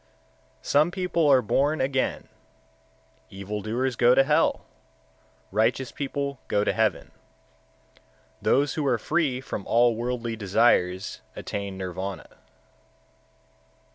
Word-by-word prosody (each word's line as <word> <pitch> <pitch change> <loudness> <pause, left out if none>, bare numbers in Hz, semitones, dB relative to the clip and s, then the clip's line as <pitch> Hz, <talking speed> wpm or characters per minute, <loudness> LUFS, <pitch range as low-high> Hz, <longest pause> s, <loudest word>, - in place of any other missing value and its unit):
126. - - -12
Some 150 +4 +4
people 175 -3 0
are 135 -3 +5
born 145 +8 +1
again; 130 0 -1 1.0
evil 100 +2 -6
doers 120 +5 -2
go 120 +2 +5
to 135 - +6
hell; 150 +3 +1 0.9
righteous 115 +5 +1
people 140 -1 -4
go 105 - +1
to - - 0
heaven; 110 -1 0 1.3
those 140 +1 +2
who 150 -3 -2
are 125 -3 +2
free 145 0 0
from 105 - -5
all 120 0 +3
worldly 120 0 -3
desires 95 -3 +1
attain 100 -2 -5
Nirvana. 95 +1 -5
120 Hz, 110 wpm, -25 LUFS, 105-140 Hz, 1.3 s, to